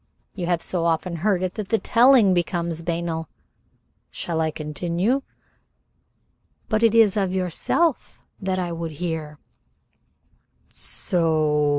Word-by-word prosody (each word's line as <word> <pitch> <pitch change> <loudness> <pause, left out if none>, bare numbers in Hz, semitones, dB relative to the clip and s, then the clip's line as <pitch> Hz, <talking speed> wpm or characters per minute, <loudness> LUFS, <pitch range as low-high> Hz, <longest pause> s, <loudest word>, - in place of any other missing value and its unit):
You 180 -4 -4
have 175 -2 0
so 175 -2 -2
often 170 +1 0
heard 185 +1 +1
it 185 - -2
that 210 -3 -6
the 225 - +3
telling 235 -4 +5
becomes 170 -2 -1
banal? 165 -1 -3 0.8
Shall 165 -2 -3
I 160 - +1
continue?" 170 - -1 1.5
"But 215 0 +1
it 230 -1 +4
is 220 -4 +5
of 195 -3 0
yourself 190 - 0 0.2
that 190 -1 -1
I 180 -2 -2
would 165 -1 -5
hear." 160 -2 -4 1.4
"So? 155 -4 0
175 Hz, 120 wpm, -23 LUFS, 160-195 Hz, 1.5 s, telling